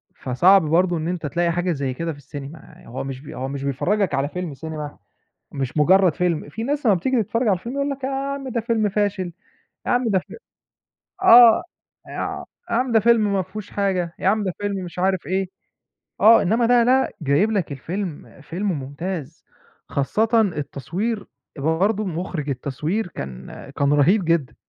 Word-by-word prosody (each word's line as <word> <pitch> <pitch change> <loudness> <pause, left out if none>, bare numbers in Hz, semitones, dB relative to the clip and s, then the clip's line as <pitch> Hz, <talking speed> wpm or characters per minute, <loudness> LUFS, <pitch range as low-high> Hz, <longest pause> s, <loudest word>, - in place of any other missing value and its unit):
فصعب 180 +10 +4
برضه 175 +3 +2
إن 160 0 -3
أنتَ 175 -2 -3
تلاقي 170 +3 0
حاجة 175 +1 0
زي 140 -4 -2
كده 165 +5 -3
في 150 - -9
السينما. 145 +2 -9 0.3
آآ، - - -16
هو 130 +3 -5
مش 135 -1 -6
بي 145 - -10
هو 130 - -4
مش 140 0 -5
بيفرّجَك 175 +7 0
على 140 +1 0
فيلم 180 -3 -5
سينما، 150 0 -7 0.6
مش 135 -1 -4
مجرَّد 180 +3 +5
فيلم. 175 -5 -1
في 155 +10 -6
ناس 280 +2 -1
أمَّا 210 - +6
بتيجي 230 +7 +1
تتفرَّج 230 +4 -1
على 190 -3 +3
الفيلم 235 +8 -7
يقول 280 0 -1
لك: 275 -1 -5
"يا - - 0
عم 275 0 -3
ده 240 -2 -1
فيلم 225 -2 0
فاشل، 200 -3 -1 0.5
يا - - 0
عم 245 -1 +2
ده 195 -3 +3
فيلم 185 - -12 0.8
آه، 240 -10 +8 0.4
يع - - -4 0.3
يا - - 0
عم 250 +1 +1
ده 225 - +5
فيلم 215 -2 +3
ما 195 - +2
فيهوش 190 +3 -8
حاجة، 185 -4 -1
يا - - -1
عم 210 +2 +2
ده 185 -3 -2
فيلم 205 -1 -1
مش 175 0 -8
عارِف 190 0 0
إيه." 190 0 -1 0.7
آه، 225 +1 +8
إنما 225 +6 +2
ده، 240 0 +5
لأ، 260 +2 +3
جايِب 155 +9 +2
لك 195 -8 -1
الفيلم 160 +1 -6
فيلم 185 +7 -3
ممتاز، 150 +2 -5 0.4
خاصةً 220 - +2
التصوير، 185 - -3 0.3
برضه 185 +9 +1
مخرِّج 170 -4 -4
التصوير 150 - -2
كان 65 - -8 0.3
كان 140 0 +2
رهيب 170 +7 +3
جدًا. 165 -5 0
180 Hz, 180 wpm, -22 LUFS, 150-215 Hz, 0.8 s, آه